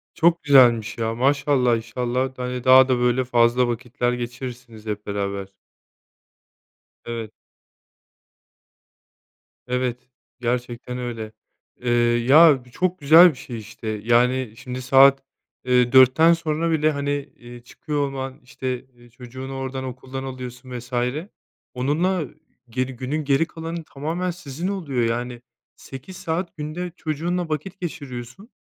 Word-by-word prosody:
Çok 170 Hz, 0 st, +3 dB
güzelmiş 120 Hz, -6 st, +5 dB
ya, 115 Hz, 0 st, -1 dB
maşallah, 135 Hz, -1 st, +2 dB
inşallah, 125 Hz, +3 st, -2 dB
hani, 125 Hz, -1 st, -4 dB
daha 130 Hz, 0 st, +7 dB
da 130 Hz, -1 st, +2 dB
böyle 125 Hz, +1 st, +2 dB
fazla 120 Hz, 0 st, +3 dB
vakitler 120 Hz, +1 st, -2 dB
geçirirsiniz 120 Hz, -2 st, -7 dB
hep 105 Hz, -1 st, -5 dB
beraber. 100 Hz, -1 st, -3 dB, 1.5 s
Evet. 115 Hz, -2 st, -5 dB, 2.4 s
Evet 125 Hz, 0 st, -2 dB, 0.3 s
gerçekten 125 Hz, 0 st, -3 dB
öyle. 115 Hz, -3 st, -5 dB, 0.5 s
Eee, 125 Hz, -, -2 dB, 0.4 s
ya, 145 Hz, -3 st, +7 dB
bu 125 Hz, -, -19 dB
çok 185 Hz, +3 st, -1 dB
güzel 160 Hz, +5 st, +8 dB
bir -, -, -13 dB
şey, 120 Hz, -3 st, -7 dB
işte. 110 Hz, +1 st, -10 dB, 0.2 s
Yani, 120 Hz, 0 st, +2 dB
şimdi 125 Hz, 0 st, -6 dB
saat, 135 Hz, +1 st, +6 dB, 0.4 s
eee, 125 Hz, -1 st, +3 dB
4'ten 130 Hz, +6 st, +7 dB
sonra 165 Hz, 0 st, -1 dB
bile, 155 Hz, -1 st, +2 dB
hani, 145 Hz, -1 st, -2 dB
eee, 120 Hz, -4 st, -7 dB
çıkıyor 145 Hz, +3 st, -3 dB
olman, 135 Hz, 0 st, -6 dB
işte, 130 Hz, 0 st, -5 dB, 0.3 s
çocuğunu 130 Hz, +2 st, -8 dB
oradan 130 Hz, 0 st, -4 dB
okuldan 130 Hz, +1 st, -6 dB
alıyorsun 125 Hz, -1 st, -7 dB
vs. 125 Hz, +2 st, -14 dB, 0.8 s
onunla 155 Hz, +7 st, 0 dB, 0.4 s
geri, 130 Hz, +2 st, -2 dB
günün 145 Hz, +5 st, -3 dB
geri 140 Hz, +3 st, +3 dB
kalanı, 165 Hz, 0 st, -6 dB
tamamen 165 Hz, +6 st, -3 dB
sizin 165 Hz, 0 st, -6 dB
oluyor 155 Hz, -11 st, -2 dB
yani. 120 Hz, +1 st, -2 dB, 0.3 s
8 140 Hz, +8 st, -10 dB
saat 170 Hz, +1 st, -3 dB
günde 155 Hz, +4 st, -5 dB
çocuğunla 170 Hz, +2 st, -2 dB
vakit 170 Hz, +6 st, -4 dB
geçiriyorsun. 145 Hz, -, -7 dB
130 Hz, 120 wpm, -23 LUFS, 120-150 Hz, 2.4 s, güzel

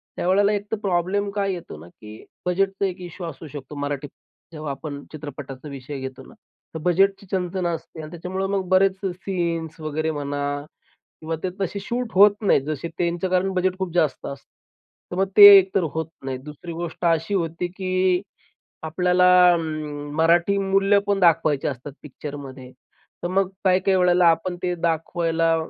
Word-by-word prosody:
त्यावेळेला 200 Hz, +3 st, +2 dB
एक 205 Hz, +1 st, -4 dB
तर 220 Hz, -, 0 dB
प्रॉब्लेम 195 Hz, +1 st, 0 dB
काय 200 Hz, -1 st, 0 dB
येतो 175 Hz, -, -8 dB
ना, 80 Hz, -, -12 dB
की 105 Hz, +4 st, -13 dB, 0.2 s
बजेटचा 195 Hz, +2 st, 0 dB
एक 185 Hz, -1 st, -4 dB
इश्यू 175 Hz, 0 st, -7 dB
असू 160 Hz, 0 st, -9 dB
शकतो. 145 Hz, 0 st, -9 dB
मराठीत 145 Hz, 0 st, -4 dB
अ 165 Hz, -, -23 dB
जेव्हा 155 Hz, -2 st, -4 dB
आपण 140 Hz, +1 st, -7 dB
चित्रपटाचा 145 Hz, -2 st, -8 dB
विषय 140 Hz, 0 st, -7 dB
घेतो 130 Hz, -1 st, -7 dB
ना. -, -, -15 dB, 0.5 s
बजेटची 195 Hz, +3 st, +2 dB
चंचण 185 Hz, -1 st, -1 dB
असते 165 Hz, -1 st, -5 dB
आणि 155 Hz, 0 st, -9 dB
त्याच्यामुळे 185 Hz, +3 st, -4 dB
मग 195 Hz, -1 st, 0 dB
बरेच 190 Hz, 0 st, +4 dB
सीन्स 170 Hz, -4 st, -3 dB
वगैरे 155 Hz, +1 st, -2 dB
म्हणा 145 Hz, -1 st, -4 dB, 0.8 s
किंवा 160 Hz, +1 st, -3 dB
ते 185 Hz, -, 0 dB
तसे 195 Hz, +1 st, -2 dB
शूट 235 Hz, +3 st, -3 dB
होत 200 Hz, +3 st, +8 dB
नाहीत. 200 Hz, -9 st, +3 dB
जसे 155 Hz, +3 st, -4 dB
त्यांचं 175 Hz, +1 st, -1 dB
कारण 185 Hz, +1 st, +1 dB
बजेट 185 Hz, 0 st, 0 dB
खूप 185 Hz, -3 st, -3 dB
जास्त 155 Hz, -6 st, +1 dB
असतं. 140 Hz, -, -8 dB, 0.6 s
तर -, -, -3 dB
मग 195 Hz, +1 st, +2 dB
ते 205 Hz, -, +12 dB
एक 190 Hz, 0 st, +4 dB
तर 190 Hz, -, +3 dB
होत 160 Hz, -1 st, -2 dB, 0.2 s
नाही. 130 Hz, -1 st, -3 dB
दुसरी 150 Hz, +5 st, -9 dB
गोष्ट 170 Hz, +1 st, -5 dB
अशी 165 Hz, +3 st, +1 dB
होती, 170 Hz, -2 st, -1 dB
की 185 Hz, 0 st, 0 dB, 0.6 s
आपल्याला 180 Hz, +3 st, +2 dB, 0.3 s
अं, 155 Hz, -3 st, -4 dB
मराठी 170 Hz, +4 st, +3 dB
मूल्य 195 Hz, +1 st, +3 dB
पण 200 Hz, -1 st, +1 dB
दाखवायची 155 Hz, -5 st, +3 dB
असतात 135 Hz, +1 st, -5 dB
पिक्चरमध्ये. 140 Hz, -3 st, -9 dB, 0.5 s
तर -, -, 0 dB
मग 190 Hz, +1 st, +1 dB, 0.2 s
काही-काही 190 Hz, +1 st, +3 dB
वेळेला 180 Hz, -1 st, +4 dB
आपण 165 Hz, +2 st, +2 dB
ते 180 Hz, -1 st, 0 dB
दाखवायला 165 Hz, 0 st, 0 dB
175 Hz, 165 wpm, -23 LUFS, 150-190 Hz, 0.8 s, ते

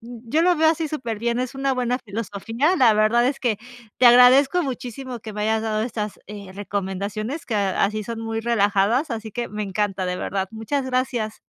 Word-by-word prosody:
yo 240 Hz, +5 st, -2 dB
lo 355 Hz, 0 st, +4 dB
veo 315 Hz, 0 st, +4 dB
así 320 Hz, 0 st, 0 dB
superbién, 235 Hz, -5 st, -2 dB
es 255 Hz, 0 st, -3 dB
una 270 Hz, 0 st, 0 dB
buena 250 Hz, 0 st, 0 dB
filosofía. 225 Hz, -, -1 dB
La 250 Hz, -7 st, +5 dB
verdad, 215 Hz, +3 st, +3 dB
es 275 Hz, 0 st, -3 dB
que 235 Hz, -4 st, 0 dB, 0.4 s
te 250 Hz, -, +6 dB
agradezco 255 Hz, +8 st, +7 dB
muchísimo 255 Hz, -1 st, -6 dB
que 215 Hz, 0 st, -8 dB
me 210 Hz, 0 st, -4 dB
hayas 220 Hz, +1 st, +1 dB
dado 215 Hz, -1 st, -1 dB
estas, 215 Hz, -3 st, -4 dB
eh, 205 Hz, -2 st, -9 dB
recomendaciones, 205 Hz, -, -4 dB
que 230 Hz, -, -3 dB
así 200 Hz, +1 st, 0 dB
son 230 Hz, +2 st, -6 dB
muy 225 Hz, 0 st, -3 dB
relajadas, 225 Hz, +4 st, +2 dB
así 220 Hz, -1 st, -5 dB
que 240 Hz, +3 st, -4 dB
me 210 Hz, 0 st, -4 dB
encanta, 195 Hz, -1 st, -2 dB
de 180 Hz, 0 st, -2 dB
verdad. 190 Hz, +1 st, -2 dB
Muchas 225 Hz, +5 st, -3 dB
gracias. 255 Hz, -4 st, -2 dB
225 Hz, 185 wpm, -23 LUFS, 210-255 Hz, 0.4 s, agradezco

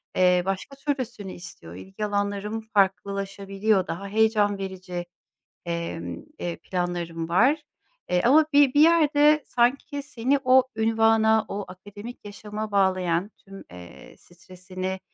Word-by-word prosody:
eee, 180 Hz, -1 st, +4 dB
başka 195 Hz, +8 st, -4 dB
türlüsünü 250 Hz, -8 st, -4 dB
istiyor, 85 Hz, -, -11 dB
ilgi 195 Hz, -, -6 dB
alanlarım 205 Hz, +1 st, -2 dB
farklılaşabiliyor, 195 Hz, -1 st, 0 dB
daha 195 Hz, +4 st, -5 dB
heyecan 210 Hz, -1 st, +2 dB
verici, 185 Hz, -2 st, -6 dB, 0.6 s
emm, 170 Hz, -1 st, -5 dB
eee, 175 Hz, -1 st, -4 dB
planlarım 175 Hz, -2 st, -4 dB
var, 260 Hz, -, +3 dB, 0.5 s
eee, 180 Hz, 0 st, +2 dB
ama 300 Hz, +5 st, +5 dB
bi 285 Hz, -2 st, +5 dB
bir 290 Hz, -, +4 dB
yerde 305 Hz, -2 st, +5 dB
sanki 275 Hz, +4 st, 0 dB
seni 275 Hz, 0 st, 0 dB
o 260 Hz, 0 st, +6 dB
ünvana, 220 Hz, 0 st, +3 dB
o 200 Hz, 0 st, -4 dB
akademik 205 Hz, +6 st, -11 dB
yaşama 210 Hz, +1 st, -6 dB
bağlayan 185 Hz, -1 st, +1 dB
tüm, 195 Hz, 0 st, -12 dB
eee, 90 Hz, -1 st, -13 dB
stresini, 185 Hz, +1 st, -7 dB
200 Hz, 120 wpm, -25 LUFS, 185-230 Hz, 0.6 s, o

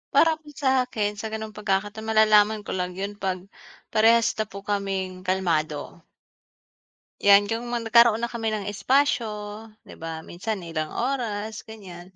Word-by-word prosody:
Para 325 Hz, -1 st, +6 dB
po 300 Hz, -, -15 dB
sa 265 Hz, -2 st, +3 dB
akin 210 Hz, -3 st, -1 dB
sa 220 Hz, -, -4 dB
ganong 220 Hz, -1 st, -5 dB
pagkakataon 210 Hz, +1 st, -2 dB
malalaman 215 Hz, -1 st, +4 dB
ko -, -, -4 dB
lang 180 Hz, -1 st, -3 dB
yun 200 Hz, +1 st, -3 dB
'pag, 190 Hz, -2 st, -3 dB, 0.5 s
parehas 230 Hz, +1 st, +5 dB
na 215 Hz, -, 0 dB
po 200 Hz, 0 st, -10 dB
kaming 195 Hz, -2 st, -2 dB
kalmado. 165 Hz, -6 st, -1 dB, 1.2 s
'Yan, 205 Hz, +1 st, +5 dB
yung 235 Hz, +2 st, -2 dB
mga 240 Hz, -1 st, -2 dB
nagkaroon 235 Hz, -1 st, +6 dB
na 235 Hz, -, -1 dB
kami 230 Hz, -2 st, -3 dB
ng 215 Hz, -2 st, -1 dB
espasyo, 260 Hz, +1 st, +2 dB, 0.6 s
'di -, -, -14 dB
ba? 160 Hz, 0 st, -6 dB
Minsan 195 Hz, +2 st, -5 dB
ilang 160 Hz, -2 st, -3 dB
oras, 220 Hz, -, -3 dB
ganyan. 185 Hz, -4 st, -11 dB
210 Hz, 155 wpm, -25 LUFS, 190-225 Hz, 1.2 s, Para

